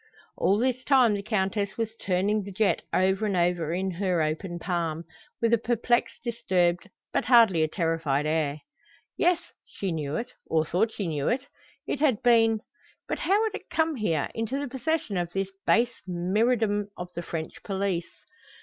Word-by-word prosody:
All 200 - +2
this 255 +2 0
time 255 -6 +5
the 200 - -2
Countess 200 -1 -1
was 225 -1 -2
turning 200 +3 +1
the 200 0 -8
jet 210 +1 +1
over 190 +3 +2
and 195 -3 0
over 175 -2 +1
in 190 +2 -1
her 180 -1 0
open 165 +3 -3
palm, 170 -2 -2 0.4
with 230 0 +2
a 235 - +5
perplexed, 240 +1 0
disturbed, 185 -6 0 0.2
but - - +1
hardly 230 -9 +6
a 155 - +3
terrified 160 -4 0
air. 155 -1 0 0.5
Yes, 350 0 +3 0.2
she 195 -2 -4
knew 150 -2 -3
it, 245 +2 -3 0.2
or 160 -1 +2
thought 210 +8 +1
she 205 - -4
knew 150 -3 -1
it. 260 +3 0 0.4
It - - -2
had 270 -8 +2
been 225 -2 +4 0.5
But - - -2
how 405 +4 +2
had 440 -2 -1
it - - -8
come 320 0 +1
here, 170 - 0
into 225 +4 -2
the 285 0 -3
possession 265 - -2
of 175 -1 -2
this 195 0 -2 0.2
base 240 +1 +4
myrmidon 205 +4 +1
of 180 0 -6
the 170 - -4
French 165 -2 -6
police? 190 -4 -3
200 Hz, 175 wpm, -27 LUFS, 175-235 Hz, 0.5 s, hardly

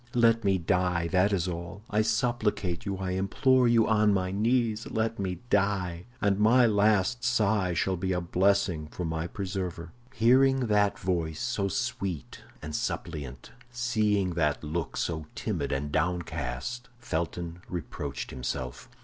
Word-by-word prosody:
Let 115 -1 +4
me 95 -1 +3
die; 90 -1 0
that 95 +3 +3
is 95 -3 0
all. 85 +3 -6
I 105 - +1
supplicate 110 -5 0
you, 100 -1 -2
I 95 -1 -3
implore 125 +7 +3
you 115 -2 +4
on 105 -2 +4
my 95 -1 -1
knees—let 110 0 0
me 90 -3 -3
die, 95 -4 +1
and 100 -4 +1
my 120 +4 +6
last 105 +2 +2
sigh 105 -7 +2
shall 95 +2 0
be 95 +2 -2
a 90 - +1
blessing 90 -2 +1
for 90 +3 -5
my 80 +1 -2
preserver." 90 -3 -4 0.2
Hearing 130 +3 +4
that 105 -4 +2
voice, 85 -4 -2
so 120 -5 -1
sweet 95 -3 -3 0.2
and 75 0 -5
suppliant, 70 -6 -4 0.2
seeing 110 -6 +1
that 80 -4 0
look, 80 +2 -3
so 80 -2 -2
timid - - -2
and 75 +2 -2
downcast, 85 - -2
Felton 85 -6 -4
reproached 90 -4 -5
himself. 65 0 -5
95 Hz, 140 wpm, -28 LUFS, 85-110 Hz, 0.2 s, my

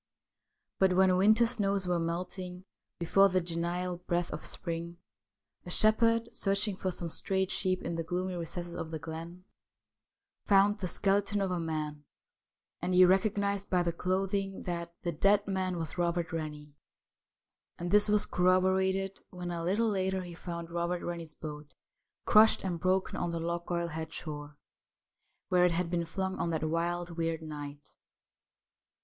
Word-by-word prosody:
But 190 -1 +4
when 185 0 +5
winter 215 +5 +5
snows 200 -5 0
were 175 -1 +1
melting 180 +2 -4 0.3
before 195 +4 +4
the 185 0 +2
genial 175 +1 -2
breath 175 -1 -2
of 150 - -6
spring, 170 0 -3 0.7
a - - -9
shepherd, 230 +4 +3
searching 200 +1 +1
for 185 - -2
some 175 -1 -3
strayed 190 +3 0
sheep 185 -1 0
in 170 - -3
the 165 0 -2
gloomy 180 +3 -2
recesses 175 0 -5
of 160 - -5
the 160 - -4
glen, 165 +3 -8 1.0
found 205 +1 +4
the 185 - -2
skeleton 200 +3 +1
of 195 -2 0
a 180 - -1
man, 155 -2 -3 0.8
and 180 +1 0
he 185 0 +8
recognised 200 +1 +1
by 180 -1 +2
the 170 -1 -1
clothing 195 +2 -1
that 170 -1 -3
the 175 - 0
dead 200 +6 +3
man 185 -2 -1
was 165 +1 -3
Robert 170 0 0
Rennie, 150 -2 -5 1.0
and 175 0 -4
this 210 +1 +5
was 210 0 +4
corroborated 190 +1 +2
when 180 -1 -6
a 170 -1 -3
little 210 +6 +1
later 190 -1 0
he 175 -1 -8
found 170 -1 -6
Robert 170 +1 -1
Rennie's 170 -3 -5
boat 150 -1 -8 0.5
crushed 215 +1 +6
and 180 -3 -2
broken 185 +2 +1
on 175 - -1
the 170 0 -2
Lochgoilhead 170 -1 -3
shore, 145 -1 -7 0.9
where 180 -1 +4
it 180 -1 +4
had 170 0 -1
been 170 -1 0
flung 190 +3 -3
on 170 - 0
that 160 -2 -1
wild, 170 +2 -1
weird 165 -1 -2
night. 145 -2 -8
180 Hz, 155 wpm, -31 LUFS, 170-190 Hz, 1.0 s, he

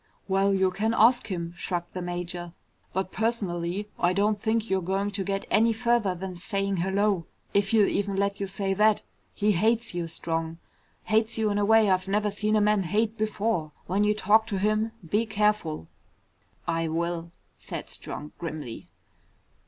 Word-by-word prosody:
"Well, 195 0 +2
you 190 -1 +2
can 220 +5 0
ask 240 +3 +5
him," 170 -3 -4
shrugged 175 -1 -4
the 185 - -4
major. 175 -1 -4 0.4
"But 190 0 -2
personally, 200 -4 -1
I 175 +1 +3
don't 205 +1 +1
think 225 0 0
you're 190 -2 +1
going 195 +3 -1
to 200 -1 -2
get 195 +1 -2
any 225 +2 +4
further 235 -4 +1
than 185 +1 -5
saying 195 +2 -1
hello. 190 -1 +1 0.3
If 200 -1 +2
he'll 215 -2 +5
even 200 -1 -1
let 200 0 0
you 200 - -2
say 195 0 -1
that. 210 +2 +3 0.3
He 210 0 +2
hates 225 +5 +1
you, 175 -1 -2
Strong. 165 0 -2 0.5
Hates 220 +1 +1
you 220 -2 +1
in 205 - 0
a 205 - +2
way 220 0 +5
I've 185 0 +1
never 210 +1 +1
seen 210 +1 0
a 215 - +4
man 210 -1 +3
hate 215 +5 0
before. 210 -7 -1
When 195 +3 +1
you 210 0 +3
talk 220 +2 +4
to 200 - -2
him, 215 +3 +1 0.2
be 210 +7 +1
careful." 210 - 0 0.8
"I 165 -1 0
will," 170 +1 -2 0.3
said - - -6
Strong 150 - -5
grimly. 155 -8 -6
200 Hz, 175 wpm, -27 LUFS, 175-215 Hz, 0.8 s, ask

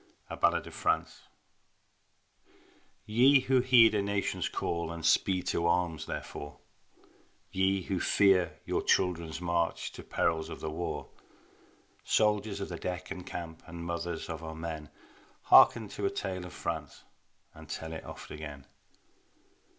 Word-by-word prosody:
A - - -3
BALLAD - - +2
OF - - -10
FRANCE - - -1 1.8
Ye 130 +5 +5
who 130 0 +3
heed 120 -3 +6
a 105 - +2
nation's 100 0 -1
call 85 -1 -2
And 85 -1 -6
speed 95 -2 +3
to 85 - +1
arms 85 -2 0
therefor, 75 0 -6 0.9
Ye 95 0 +1
who 95 +1 -2
fear 95 -2 +3
your - - 0
children's 85 -3 +1
march 85 -1 -1
To - - -9
perils 80 -1 0
of - - -7
the 80 - -4
war, 85 +2 -4 0.9
Soldiers 105 -1 +1
of 100 - -4
the 85 - -6
deck 90 0 -4
and 95 -1 -5
camp 80 -2 -6
And 85 +1 -7
mothers 85 -1 -3
of 80 0 -6
our 80 0 -6
men, 80 -2 -6 0.5
Hearken 110 -3 +7
to 100 0 -2
a - - +1
tale 95 -2 -4
of 90 - -12
France 80 -3 -5 0.5
And - - -13
tell 80 0 -5
it 80 - -6
oft - - -10
again. 75 -3 -8
85 Hz, 145 wpm, -30 LUFS, 80-100 Hz, 1.8 s, Hearken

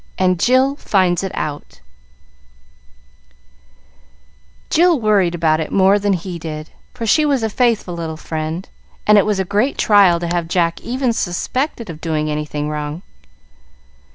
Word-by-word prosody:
And 185 -2 +1
Jill 260 +6 +3
Finds 185 -7 +1
It 190 - -3
Out 145 - -5 2.9
Jill 340 -2 +4
worried 200 -6 +2
about 160 -2 +1
it 160 - -4
more 195 +1 +4
than 205 0 +1
he 180 -1 -4
did, 155 -1 -7 0.2
for 235 -2 -4
she 305 +8 +3
was 280 -5 +1
a 220 - -1
faithful 230 -6 0
little 165 -2 -5
friend, 160 +3 -5 0.4
and 210 0 +6
it 200 - +1
was 210 -2 0
a 190 - 0
great 210 +9 0
trial 200 -5 +4
to 175 - -4
have 170 -1 -1
Jack 170 -1 0
even 250 0 -1
suspected 230 - -2
of 155 -1 -12
doing 155 -2 -1
anything 150 0 -3
wrong. 150 +3 -5
185 Hz, 150 wpm, -18 LUFS, 160-220 Hz, 2.9 s, and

